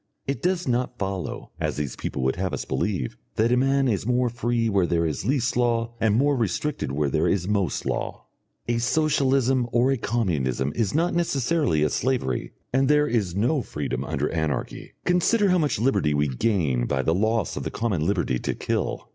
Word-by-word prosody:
It 140 - -3
does 180 -1 0
not 125 0 0
follow, 95 -2 -4
as - - -2
these 70 -4 -3
people 65 - -4
would 65 +1 +1
have 95 +1 -2
us - - -5
believe, 65 - -2 0.2
that 115 +2 +2
a - - +5
man 135 +1 +2
is 105 -6 0
more 125 +2 +1
free 120 0 0
where 100 -5 +2
there 85 -1 +1
is 80 +3 -3
least 130 0 +1
law 120 -1 +1
and 110 -2 +3
more 140 +4 +3
restricted 125 - -1
where 70 0 0
there - - +2
is 95 -2 0
most 100 -7 0
law. - - -3 0.4
A 120 0 +1
socialism 135 -2 +2
or 125 +3 +3
a 135 - +1
communism 75 - -1
is 115 +1 0
not 170 +3 +2
necessarily 145 - +1
a 75 - +2
slavery, 120 - -1 0.2
and 135 +1 +3
there 150 +1 +4
is 100 - 0
no 125 +8 +1
freedom 70 - -4
under 75 0 -1
Anarchy. 80 -3 -3
Consider 195 +4 +3
how 180 -1 +4
much 150 -3 +1
liberty 100 - +1
we 75 +1 +2
gain 65 - 0
by 65 - 0
the 80 - +2
loss 110 +2 0
of - - -3
the - - -3
common 105 -9 -1
liberty 85 -9 0
to - - -2
kill. - - -2
115 Hz, 195 wpm, -25 LUFS, 85-130 Hz, 0.4 s, a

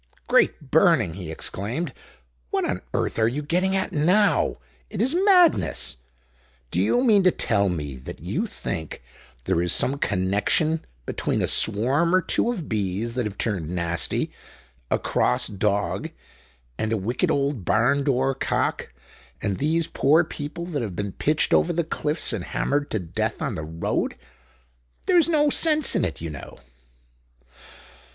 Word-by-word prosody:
"Great 140 - +2
burning!" 160 - +4
he 90 -2 -7
exclaimed. 105 - -4 0.6
"What - - 0
on - - -2
earth - - -1
are 110 - +4
you 140 +6 -2
getting 180 +5 +1
at 190 +1 -1
now? 180 +7 +2 0.3
It 205 - -6
is 255 +7 +2
madness. 360 - +3 0.7
Do 90 - +1
you 240 - +2
mean 215 -6 +5
to 185 - +5
tell 100 - +1
me 75 -6 -4
that 65 - -9
you - - -2
think 80 -5 -6 0.4
there 85 - +1
is 85 -1 0
some 140 +9 +2
connection 105 - +1 0.2
between - - -1
a - - +3
swarm 135 - +2
or 185 - +4
two - - +1
of 195 -11 -3
bees 105 +2 -2
that 125 -1 -1
have 100 - -9
turned 95 -9 -2
nasty, 85 -1 -1 0.6
a - - +2
cross - - +1
dog, 100 0 -1 0.7
and 110 - -1
a 115 - +1
wicked 110 +5 -1
old 140 -6 0
barn 125 +10 +2
door 135 -1 +1
cock 135 - -2 0.5
and 100 -2 -2
these 160 +3 +2
poor 155 +5 +3
people 160 +1 -6
that 155 -6 -3
have 105 -6 -4
been 100 +1 -3
pitched 150 +10 +1
over 175 - +3
the 170 0 0
cliffs 150 -3 -1
and 100 -6 -4
hammered 145 +1 -1
to - - -1
death 85 -5 -3
on - - -2
the - - -4
road? 80 +2 -2 0.9
There's 345 -3 +4
no 295 -3 +3
sense 310 -1 +3
in - - +2
it, 85 -4 -3
you 80 -1 -4
know." 75 - -10
135 Hz, 160 wpm, -24 LUFS, -, 0.9 s, mean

